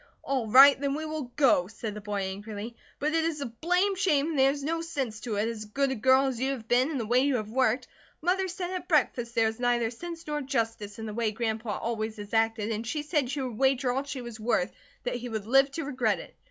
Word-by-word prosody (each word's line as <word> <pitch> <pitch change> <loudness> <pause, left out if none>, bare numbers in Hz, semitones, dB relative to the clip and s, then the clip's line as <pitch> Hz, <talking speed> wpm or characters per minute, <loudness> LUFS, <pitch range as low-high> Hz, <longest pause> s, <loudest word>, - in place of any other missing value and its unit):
"All 265 -4 -1
right, 270 +5 +8
then 280 -1 0
we 315 +1 -4
will 305 -5 -5
go," 245 -11 +4
said 220 0 -6
the 210 - -7
boy, 205 -1 -3
angrily. 205 +4 -6 0.2
"But 305 +2 -1
it 325 0 +2
is 325 -2 -1
a 280 - -3
blame 360 - +1
shame 325 -6 +2
and 295 - -1
there 265 0 +6
is 285 0 -3
no 330 +3 -1
sense 270 -10 -3
to 220 -1 -4
it, 210 +2 +1
as 225 -2 -4
good 270 +6 0
a - - -1
girl 260 +4 +4
as 260 -3 -2
you 265 +2 0
have 230 -4 -8
been, 250 +4 +3
and 290 -5 -2
the 230 - -2
way 240 +3 +3
you 275 0 +2
have 215 -2 -3
worked. 255 0 +1 0.3
Mother 375 +3 +1
said 360 0 -4
at 360 -2 -5
breakfast 250 -7 +1
there 225 -1 +4
was 220 +1 -2
neither 240 -2 +1
sense 335 +7 -8
nor 295 -1 -2
justice 225 -5 -2
in 225 - -6
the 215 - -5
way 230 0 0
Grandpa 220 -1 -2
always 220 -1 -3
has 205 +1 -9
acted 225 -1 +1
and 225 +1 -3
she 295 +5 -2
said 295 -4 0
she 280 +1 -2
would 245 -4 -5
wager 265 -1 +3
all 265 +2 -1
she 280 -3 -6
was 235 -2 -8
worth 215 -5 +1 0.3
that 245 0 -2
he 245 0 -6
would 220 -3 -4
live 270 +4 +5
to 325 -1 -3
regret 250 -6 +1
it. - - -11
250 Hz, 260 wpm, -28 LUFS, 225-285 Hz, 0.3 s, right